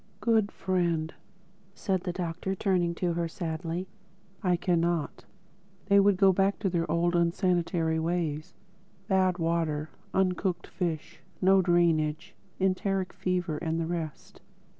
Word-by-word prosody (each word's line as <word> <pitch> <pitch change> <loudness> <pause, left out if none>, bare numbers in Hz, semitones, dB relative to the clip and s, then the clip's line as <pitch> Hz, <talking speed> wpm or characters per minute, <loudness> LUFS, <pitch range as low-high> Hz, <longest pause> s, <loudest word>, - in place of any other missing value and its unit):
"Good 220 -3 +2
friend," 170 -4 -1 0.6
said 190 -2 -1
the 180 - -3
Doctor 180 +1 -3
turning 180 -4 +1
to 175 0 0
her 170 0 -1
sadly, 165 +1 -4 0.5
"I 180 -2 +2
cannot. 170 -2 0 0.6
They 200 0 +5
would 200 -1 +4
go 195 -1 +5
back 195 +2 +2
to 195 -3 0
their 170 -2 -1
old 175 +1 +1
unsanitary 170 -2 +1
ways: 160 -2 -2 0.5
bad 185 -3 +2
water, 165 -3 -1 0.2
uncooked 185 -1 0
fish, 165 -4 -4 0.2
no 190 +1 +5
drainage, 170 -1 +1 0.3
enteric 190 0 0
fever 180 -4 -1
and 165 0 -1
the 165 - -1
rest.... 165 -3 -5
175 Hz, 125 wpm, -28 LUFS, 165-190 Hz, 0.6 s, They